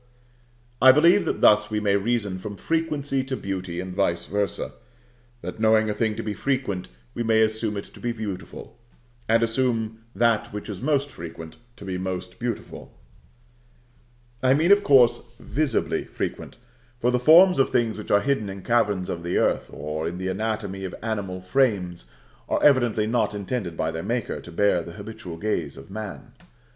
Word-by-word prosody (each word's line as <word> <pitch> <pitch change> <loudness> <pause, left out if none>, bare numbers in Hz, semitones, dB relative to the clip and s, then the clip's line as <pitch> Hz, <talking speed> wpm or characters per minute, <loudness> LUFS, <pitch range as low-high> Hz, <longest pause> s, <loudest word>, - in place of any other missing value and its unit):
I 130 +1 +10
believe 170 +8 +5
that - - -2
thus 105 0 +5
we 105 -1 -1
may 100 -1 +2
reason 100 -2 -1
from 105 +2 -6
Frequency 145 -4 -1
to 130 0 -4
Beauty 95 -3 -4
and 90 0 -5
vice 85 -3 0
versâ; 100 0 -2 0.7
that - - -7
knowing 110 -1 +4
a - - -1
thing 110 0 0
to 115 - -4
be 105 - -3
frequent, 125 -8 -2 0.2
we - - -4
may 110 -1 +4
assume 110 -1 -1
it 100 - -3
to - - -16
be 120 - -2
beautiful; 110 +1 -7 0.5
and 115 +1 +4
assume 115 -2 0 0.2
that 115 +1 +2
which 105 +1 -6
is 100 -1 -6
most 145 0 0
frequent 80 -1 -9 0.2
to 100 - -10
be 90 -1 -3
most 95 -1 -5
beautiful: 120 -1 -5 1.5
I 130 +1 +4
mean, 165 +6 +3
of 200 0 +6
course, 125 -8 +5 0.2
visibly 145 -5 -1
frequent; - - -5 0.4
for 125 0 +1
the 125 - +2
forms 165 +5 +7
of 135 - +4
things 115 -3 0
which 105 - -8
are 100 - +4
hidden 125 -5 0
in 95 -1 -8
caverns 105 -6 +1
of 85 - -4
the 85 +1 -1
earth, - - +1
or 75 +2 -4
in 85 +2 -4
the 95 0 -3
anatomy 100 -1 -3
of 95 - -5
animal 100 -5 -3
frames, 90 - 0 0.4
are - - 0
evidently 120 -6 +4
not 110 -2 0
intended 100 -4 -4
by 80 - 0
their 80 0 -4
Maker 120 +5 -2
to 85 - -11
bear 95 0 +2
the 85 0 -9
habitual 100 -4 -8
gaze 85 -8 -2
of 70 +8 -12
man. 110 +4 -7
110 Hz, 175 wpm, -24 LUFS, 95-120 Hz, 1.5 s, I